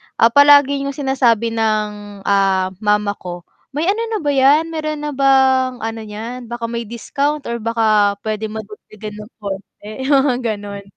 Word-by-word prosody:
ah, 230 - +4
palagi 285 +1 +6
yung 280 - -4
sinasabi 245 -5 +1
ng, 210 -2 -2
ah, 195 -2 +2
mama 210 -1 +1
ko, 175 -1 -7 0.3
"May 325 +6 0
ano 440 +3 -2
na 445 -1 -2
ba 290 - 0
'yan, 285 +4 +4
meron 310 -1 -3
na 295 - -2
bang 265 -2 +3
ano 225 0 -3
niyan, 230 +4 -7
baka 240 0 -6
may 235 -1 -3
discount 280 +6 -2
or 235 - -2
baka 215 -3 +2
puwede 215 0 -2
madagdagan 215 0 -9
ng 210 +2 -11
konti," 200 +1 -7 0.2
mga 270 -2 +4
gano'n. 205 -3 -4
230 Hz, 160 wpm, -18 LUFS, 210-275 Hz, 0.3 s, palagi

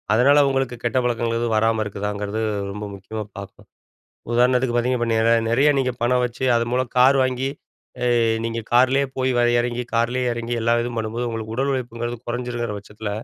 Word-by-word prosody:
அதனால 140 +4 +5
உங்களுக்கு 135 -2 -1
கெட்ட 120 +2 0
பழக்கங்கள் 115 -1 0
எதும் 115 -1 0
வராம 110 0 +2
இருக்குதாங்கிறது, 105 +1 -3 0.3
ரொம்ப 105 +1 -6
முக்கியமா 105 +3 -6
பார்ப்போம். 100 0 -10 0.7
உதாரணத்துக்கு 125 +1 +2
பார்த்தீங்கன்னா 120 0 +1
இப் 115 - 0
நிற 110 +1 +3 0.2
நிறைய 135 +6 +4
நீங்க 130 -1 0
பணம் 125 +1 +2
வச்சு, 120 +2 -6
அது 115 - +1
மூலம் 130 0 0
கார் 135 +2 +6
வாங்கி, 130 +1 -1 0.5
அ - - +1 0.4
நீங்க 115 0 -2
காரிலேயே 130 +3 +4
போய் 130 0 +1
வ - - +4 0.2
இறங்கி, 120 0 -2
கார்லயே 125 +2 +1
இறங்கி 120 +1 -3
எல்லா 115 +1 +3
இதும் 120 -1 -5
பண்ணும்போது, 115 +2 -3
உங்களுக்கு 110 -1 -5
உடல் 140 +1 +1
உழைப்புங்கிறது 120 -2 -4
குறைஞ்சிருங்கிற 120 -2 -3
பட்சத்தில, 105 +1 -7
120 Hz, 170 wpm, -22 LUFS, 115-125 Hz, 0.7 s, கார்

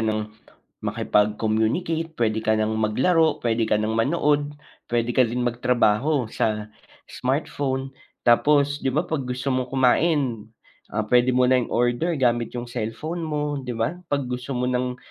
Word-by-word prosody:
nang 110 -1 -2 0.5
makipag-communicate, 110 - 0
puwede 110 -2 0
ka 110 0 +1
nang 110 0 0
maglaro, 155 +9 +2
pwede 115 -1 +1
ka - - +3
nang 110 +1 -1
manood, 145 +4 +1 0.3
puwede 120 0 0
ka 125 -1 +3
din 125 +1 -2
magtrabaho 125 +3 +1
sa 105 -1 -1 0.3
smartphone. 135 0 -2 0.3
Tapos 145 +4 +3
'di - - -1
ba 150 +6 0
pag 140 -7 -3
gusto 125 +2 -2
mo 130 0 -1
kumain, 130 -3 +1 0.4
ah, 110 0 -2
pwede 125 +1 +4
mo 125 - +4
na 130 0 +4
i-order 120 +8 0
gamit 120 -2 0
'yong 120 - -3
cellphone 120 +9 -4
mo, 150 -3 -2
'di 125 -3 -5
ba? 115 +5 0 0.2
Pag 140 -1 0
gusto 125 +1 -4
mo 125 - 0
nang 125 0 -1
125 Hz, 150 wpm, -24 LUFS, 115-145 Hz, 0.5 s, pwede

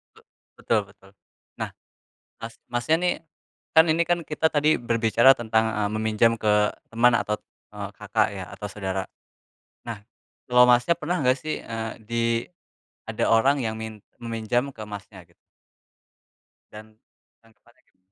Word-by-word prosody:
B - - -24 0.4
betul 115 - +1
betul. 95 -1 -20 0.5
Nah, - - -2 0.7
Mas 115 0 -7 0.2
Masnya, 120 +6 +2
nih, 180 - +3 0.6
kan 160 +1 +8
ini 160 +2 +3
kan 175 0 +3
kita 155 +1 +1
tadi 150 +1 +3
berbicara 115 +1 +4
tentang 110 -1 +1
a 105 -1 -1
meminjam 110 +1 +2
ke 105 -1 +2 0.2
teman 120 +2 +4
atau, 105 -2 0 0.4
eee, - - -6
kakak, - - +1
ya - - -6
atau 105 - -6
saudara. 95 -2 -3 0.8
Nah 115 -3 -5 0.5
kalau, 125 0 +6
Masnya, 125 +7 +4
pernah 175 +4 -2
nggak 130 0 +3
sih, 155 +3 -4
eee, 115 -1 -4
di 115 +2 -2 0.9
ada - - -1
orang 130 +6 +4
yang 110 -1 -1
min 110 -2 -8 0.2
meminjam 115 +3 -1
ke, 110 - -7
Masnya, 100 -2 -10
gitu? 85 0 -30 1.4
Dan 110 +1 -13 0.4
tanggapannya 115 +2 -26
gimana? - - -38
115 Hz, 140 wpm, -25 LUFS, 110-125 Hz, 1.4 s, kan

